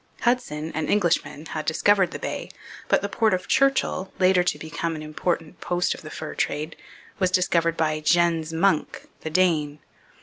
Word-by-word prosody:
Hudson, 165 -11 0
an 155 0 -2
Englishman, 165 -6 +1
had 155 -1 -5
discovered 190 +3 +3
the - - -6
Bay, - - -5 0.4
but - - +2
the - - 0
port 215 0 +2
of 185 - -6
Churchill, 265 -8 +2
later 185 -1 +4
to 175 - 0
become 160 +1 -4
an 155 - -6
important 165 +2 -3
post 175 0 0
of - - -11
the 155 - -9
fur 155 0 -6
trade, 155 +2 -2 0.4
was 185 - +3
discovered 170 -2 +2
by 155 -1 +1
Jens 165 0 +2
Munck, 165 -1 0
the 160 - -5
Dane. 155 -4 +2
170 Hz, 170 wpm, -24 LUFS, 155-185 Hz, 0.4 s, later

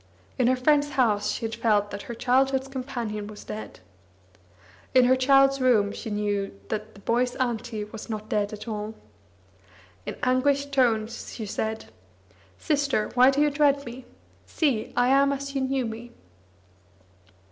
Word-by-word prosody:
In 250 - +4
her 255 - +4
friend's 290 +3 +2
house 210 -5 +2
she 230 - -4
had 225 - -4
felt 210 -3 +1
that 200 - -5
her 235 - -4
childhood's 265 +2 +2
companion 245 -6 -5
was 210 0 -10
dead. 105 -3 -8 1.1
In 255 -1 +7
her 255 +1 +5
child's 275 +1 +4
room 220 -6 +3
she 225 - -7
knew 205 - -2
that 215 0 -4
the 200 - -14
boy's 245 +3 0
"Auntie" 240 -3 -2
was 210 +2 -9
not 215 -1 -5
dead 205 -1 0
at 215 +2 -8
all. 215 0 -4 1.1
In - - -4
anguished 280 +3 +2
tones 235 -3 0
she 220 - -5
said: 220 +2 -4 0.7
"Sister, 280 -7 0
why 255 +1 +6
do 275 +2 +1
you 295 0 +3
dread 285 -1 +2
me? 245 +1 -9 0.4
See, 270 -9 0
I 245 +1 +4
am 275 +1 +4
as 275 0 -4
you 270 - -1
knew 265 -1 0
me." 230 +2 -7
245 Hz, 160 wpm, -26 LUFS, 215-270 Hz, 1.1 s, In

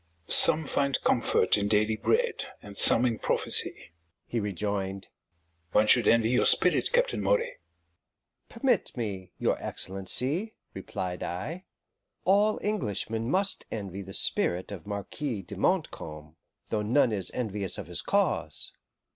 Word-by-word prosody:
"Some 155 0 +5
find 140 -1 0
comfort - - +2
in 100 - -1
daily 110 +1 +2
bread, 470 - 0
and 100 -1 -12
some 115 +4 +5
in 115 -3 -1
prophecy," - - 0 0.3
he 120 - -3
rejoined. 100 -1 -3 0.6
"One 105 - +4
should 120 +2 +4
envy 115 -1 +4
your 125 - +3
spirit, - - +3
Captain - - +1
Moray." - - 0 0.9
"Permit 235 - 0
me, 100 -5 -4
your - - -1
Excellency," 130 - 0 0.2
replied 90 -1 -5
I; 155 - -5 0.6
"all 205 +3 +3
Englishmen 115 - -2
must 195 +5 0
envy 100 -3 -5
the 95 0 -10
spirit 90 +3 +3
of 95 -6 -8
the - - -11
Marquis 105 +2 -4
de 100 - -9
Montcalm, 80 - -2 0.3
though 110 - -1
none 115 +3 +2
is 95 -4 0
envious 105 -6 -2
of - - -6
his - - -1
cause." - - 0
110 Hz, 135 wpm, -28 LUFS, 100-160 Hz, 0.9 s, Some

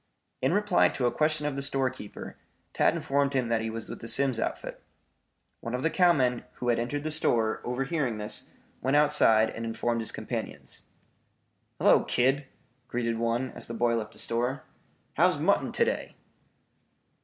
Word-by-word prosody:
In - - +2
reply 90 0 +3
to 125 - -2
a 120 - +3
question 155 -1 0
of 150 -2 -1
the 140 - -3
storekeeper, 130 -5 -3 0.4
Tad - - +3
informed 140 0 0
him 125 -3 0
that 115 -1 +1
he 110 - -3
was 115 0 -5
with - - -8
the 115 - -7
Simms 135 -1 +3
outfit. - - -4 0.8
One 115 +1 -4
of 125 - -4
the 160 - +1
cowmen 135 -10 +3
who 125 - -3
had 120 - +2
entered 145 +5 -3
the 155 - -2
store, 115 -7 +1
overhearing 135 -1 -2
this, 105 0 0 0.3
went 135 +2 +1
outside 145 -7 +4
and 115 - -6
informed 115 +1 -1
his 110 - -2
companions. - - -6 0.9
"Hello, - - +5
kid," 135 +3 +1 0.4
greeted 115 -2 -2
one, 115 +2 -1
as - - -7
the 115 - -6
boy 120 +1 +2
left 110 -2 -4
the - - -10
store. 125 +4 -1 0.5
"How's - - +4
mutton - - +1
to - - +2
day?" - - -3
125 Hz, 170 wpm, -28 LUFS, 115-140 Hz, 0.9 s, Hello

